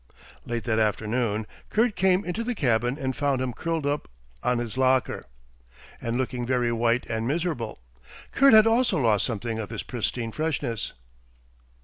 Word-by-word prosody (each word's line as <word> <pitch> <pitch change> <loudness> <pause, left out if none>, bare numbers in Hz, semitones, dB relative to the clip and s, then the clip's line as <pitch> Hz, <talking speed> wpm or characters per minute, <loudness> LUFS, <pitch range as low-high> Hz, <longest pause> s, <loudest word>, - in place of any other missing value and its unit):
Late 120 -1 -2
that 110 -2 +1
afternoon 110 0 0 0.2
Kurt 225 0 +2
came 190 +1 +3
into 180 +6 -2
the 245 +1 -2
cabin 120 - +1
and 130 -3 -2
found 140 -2 +1
him 130 -1 -2
curled 165 +2 -2
up 145 +1 -1 0.3
on 125 - +1
his 120 -1 -4
locker, 130 -1 +1 0.8
and 115 +1 -1
looking 125 -1 -2
very 120 -1 +1
white 115 +1 +1
and 110 0 -2
miserable. 150 -7 -2 0.5
Kurt 275 -4 +6
had 215 0 +8
also 230 0 +3
lost 110 -7 +3
something 115 0 -3
of 105 - -4
his - - -5
pristine 120 -1 -3
freshness. 145 -6 -2
125 Hz, 155 wpm, -26 LUFS, 115-155 Hz, 0.8 s, had